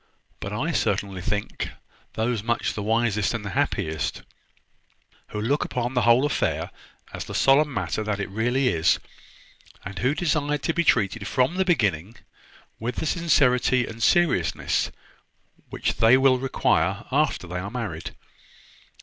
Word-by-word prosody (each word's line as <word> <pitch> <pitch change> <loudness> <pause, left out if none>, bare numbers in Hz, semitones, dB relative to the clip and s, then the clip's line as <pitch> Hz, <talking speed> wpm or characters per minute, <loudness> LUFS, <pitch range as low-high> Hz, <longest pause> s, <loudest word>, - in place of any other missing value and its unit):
But - - -5
I - - -1
certainly 95 -2 -1
think 105 +3 -3 0.4
those 115 0 -1
much 120 +2 -1
the 105 - -4
wisest 110 0 +1
and 105 -3 -5
the 100 - -4
happiest, 95 - -1 1.0
who 105 - -5
look 135 +8 +1
upon 125 0 -3
the 125 - +2
whole 120 +4 +5
affair 145 - -1 0.4
as - - -5
the - - -7
solemn 145 +2 +4
matter 95 -3 -2
that 105 -1 -2
it 100 - -2
really 120 +5 +1
is, 85 -4 +2 0.9
and 95 0 -6
who 130 +4 +1
desire 150 -3 0
to 160 +3 -2
be 170 - +1
treated, 110 - +1
from 130 +4 +1
the 190 +1 0
beginning, 105 - 0 0.6
with 120 +2 -3
the - - -3
sincerity 130 -7 +2
and 115 +1 -9
seriousness 115 - +2 0.8
which - - -2
they 115 +4 +6
will 130 -1 +4
require 110 -5 0
after 145 -7 +1
they 90 +1 -4
are 95 +2 -5
married." 100 -9 -5
120 Hz, 150 wpm, -24 LUFS, 100-135 Hz, 1.0 s, they